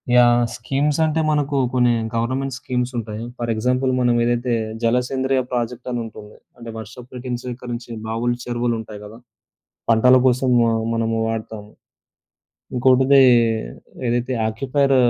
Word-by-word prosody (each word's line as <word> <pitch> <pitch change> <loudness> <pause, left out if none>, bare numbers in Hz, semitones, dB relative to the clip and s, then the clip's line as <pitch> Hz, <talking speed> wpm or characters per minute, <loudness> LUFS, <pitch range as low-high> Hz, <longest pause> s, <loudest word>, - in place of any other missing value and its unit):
Yeah! 120 0 +5
Schemes 140 +5 -1
అంటే 160 +1 0
మనకు 145 -1 0 0.2
కొన్ని 125 -1 +3 0.2
గవర్నమెంట్ 130 +3 -1
స్కీమ్స్ 125 0 -2
ఉంటాయి. 110 -1 -5
ఫర్ 120 -1 -3
ఎగ్జాంపుల్ 125 +4 0
మనం 125 -1 +3
ఏదైతే 120 +1 0 0.3
జలసేంద్రియ 130 +3 +1
ప్రాజెక్టనుంటుంది. 120 -3 -4 0.2
అంటే 120 -1 -9
వర్షపు 110 +3 -10
నీటిని 125 -1 -4
సేకరించే 120 -1 -6
బావులు, 115 +2 -1
చెరువులు 120 -1 -1
ఉంటాయి 110 -2 -8
కదా! 110 +2 -11 0.7
పంటల 125 +3 +6
కోసం 130 0 +2
వ - - +4 0.3
మనము 115 0 0
వాడతాము. 110 -2 -5 1.0
ఇంకోటిది 130 +2 +5 0.9
ఏదైతే 120 +2 0
ఆక్యుపైర్ 135 +4 +1
120 Hz, 120 wpm, -21 LUFS, 115-130 Hz, 1.0 s, పంటల